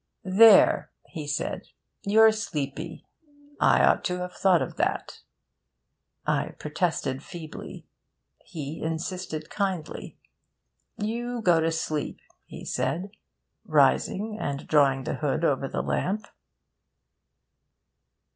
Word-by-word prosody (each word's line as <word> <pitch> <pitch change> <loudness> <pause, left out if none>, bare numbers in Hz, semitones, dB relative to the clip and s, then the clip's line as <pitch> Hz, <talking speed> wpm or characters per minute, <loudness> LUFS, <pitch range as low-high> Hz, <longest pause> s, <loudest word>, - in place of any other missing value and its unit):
'There!' 205 +3 +6 0.2
he 155 -4 -6
said, 145 +1 -3 0.3
'you're 220 +2 +6
sleepy. 165 -6 -4 0.5
I - - +4
ought - - +3
to 180 -1 -1
have 180 0 -5
thought 185 -4 +3
of - - -7
that.' - - -1 1.1
I - - -1
protested 150 -4 -2
feebly. 165 -3 -9 0.6
He 155 0 -7
insisted 160 -1 -4
kindly. 190 -6 -3 0.8
'You 235 +2 -3
go 175 -4 +5
to 165 +1 +1
sleep,' 155 -2 -3 0.2
he - - -10
said, 190 +4 -2 0.5
rising 215 +2 +2
and 140 0 -4
drawing 135 -3 +3
the - - -3
hood 155 +2 0
over 135 -3 +1
the - - -3
lamp. 210 +4 -1
170 Hz, 105 wpm, -26 LUFS, 150-200 Hz, 1.1 s, There